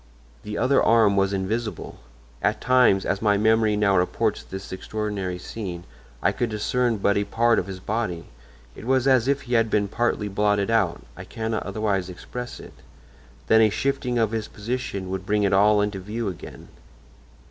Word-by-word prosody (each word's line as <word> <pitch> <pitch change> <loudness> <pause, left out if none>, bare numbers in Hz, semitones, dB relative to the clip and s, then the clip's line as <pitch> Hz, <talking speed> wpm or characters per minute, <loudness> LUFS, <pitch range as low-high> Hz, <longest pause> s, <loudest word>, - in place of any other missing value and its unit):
The 105 0 -6
other 135 +1 +3
arm 110 -3 +4
was 95 0 +2
invisible. 105 +4 -3 0.4
At 105 +1 +1
times, 125 -7 +4
as 100 - -1
my 105 -2 +3
memory 110 0 +3
now 100 -2 +2
reports 90 0 0
this 95 0 -9
extraordinary 100 -1 -4
scene, 90 -2 -6 0.4
I - - +4
could 120 - -2
discern 115 +2 0
but 100 0 +1
a 100 - +2
part 115 +2 +2
of 90 - -4
his 95 -1 -7
body; 100 -5 -3 0.5
it - - -10
was 130 +1 +2
as 130 -2 +4
if 140 0 +1
he 125 - -6
had 115 -1 +3
been 105 -1 +1
partly 110 0 -1
blotted 105 +1 +1
out—I 65 - -1
cannot 110 -1 -3
otherwise 100 -2 -1
express 125 +7 -7
it—then 70 - -3
a 110 - +5
shifting 130 +2 -1
of 110 -2 +1
his 110 -2 -3
position 110 -3 -4
would 95 -1 -3
bring 105 +1 +1
it 100 - +2
all 105 +2 +5
into 105 -1 -2
view 105 +3 -4
again. 90 - -10
105 Hz, 170 wpm, -24 LUFS, 95-115 Hz, 0.5 s, a